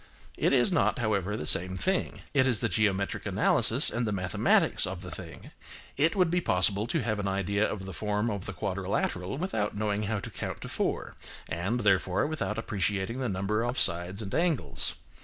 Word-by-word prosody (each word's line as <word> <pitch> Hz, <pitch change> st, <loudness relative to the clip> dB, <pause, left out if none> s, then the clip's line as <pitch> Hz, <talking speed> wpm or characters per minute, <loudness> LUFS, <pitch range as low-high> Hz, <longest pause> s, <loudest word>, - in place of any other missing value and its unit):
It -, -, +1 dB
is 135 Hz, +6 st, +3 dB
not, 160 Hz, -3 st, +2 dB
however, 105 Hz, -4 st, -1 dB
the 75 Hz, -, -5 dB
same 95 Hz, +4 st, +3 dB
thing. 190 Hz, -, -1 dB
It 135 Hz, -2 st, +4 dB
is 120 Hz, -4 st, +2 dB
the 115 Hz, -, +2 dB
geometric 100 Hz, 0 st, 0 dB
analysis -, -, +4 dB
and 120 Hz, 0 st, -1 dB
the -, -, -1 dB
mathematics 95 Hz, -4 st, +2 dB
of 95 Hz, 0 st, -6 dB
the 90 Hz, -, -8 dB
thing. -, -, -10 dB, 0.4 s
It 155 Hz, +6 st, +2 dB
would 180 Hz, -4 st, +2 dB
be 180 Hz, 0 st, +1 dB
possible 100 Hz, -, +2 dB
to 150 Hz, +2 st, -1 dB
have 110 Hz, -2 st, -1 dB
an 100 Hz, -, -2 dB
idea 100 Hz, +2 st, 0 dB
of 95 Hz, -3 st, -5 dB
the 95 Hz, -, -7 dB
form 105 Hz, +5 st, -1 dB
of 100 Hz, -2 st, -5 dB
the 100 Hz, -, -4 dB
quadrilateral 95 Hz, +2 st, -2 dB
without 110 Hz, -, -2 dB
knowing 105 Hz, -1 st, 0 dB
how 110 Hz, -, 0 dB
to -, -, -7 dB
count -, -, -5 dB
to -, -, -7 dB
four, -, -, -2 dB, 0.3 s
and, 95 Hz, +9 st, -2 dB
therefore, 95 Hz, -1 st, +2 dB
without 150 Hz, -8 st, -3 dB
appreciating 105 Hz, +1 st, -1 dB
the 130 Hz, -3 st, -1 dB
number 100 Hz, +3 st, -1 dB
of 120 Hz, +2 st, -2 dB
sides 90 Hz, +5 st, +1 dB
and 100 Hz, -, -7 dB
angles. 165 Hz, -4 st, +1 dB
105 Hz, 195 wpm, -28 LUFS, 95-120 Hz, 0.4 s, It